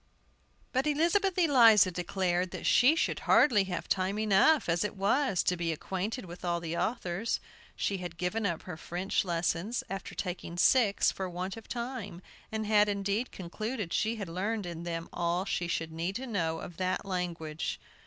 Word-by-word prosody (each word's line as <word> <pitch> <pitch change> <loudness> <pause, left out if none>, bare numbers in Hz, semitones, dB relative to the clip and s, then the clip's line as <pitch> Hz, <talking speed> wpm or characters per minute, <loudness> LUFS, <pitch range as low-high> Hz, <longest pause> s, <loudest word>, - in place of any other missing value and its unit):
But 265 +3 +1
Elizabeth 345 +6 +2
Eliza 235 - +6
declared 180 0 -1
that - - -7
she 270 +6 +5
should - - 0
hardly 210 -9 +5
have 185 -2 -4
time 190 +2 0
enough, 215 +9 +4
as 170 +2 +1
it 210 - -3
was, 205 +1 +2
to 180 - +1
be 170 -1 -1
acquainted 190 - -3
with 175 0 -10
all 175 -1 0
the 165 0 -4
authors. 215 0 -1 0.4
She 200 - -1
had 175 -2 -6
given 180 +6 -1
up 170 -3 -3
her 180 -4 -7
French 180 +4 -1
lessons, 175 +5 -1
after 195 -1 -5
taking 175 -2 -5
six, 210 +1 +4
for 190 -1 -4
want 180 +2 -4
of 225 - -11
time, 235 -7 -5 0.3
and 220 0 -2
had, 210 -1 +4
indeed, 200 +4 -1
concluded 205 +2 -4
she 220 +2 +1
had 205 -4 -5
learned 200 +5 -2
in 170 -1 -6
them 165 -1 -4
all 175 +2 0
she 175 - -1
should 165 -1 -2
need 170 +4 -3
to 260 - -3
know 165 -9 -1
of 175 - -9
that 185 +1 -1
language. 170 -4 -3
190 Hz, 175 wpm, -30 LUFS, 175-220 Hz, 0.4 s, Eliza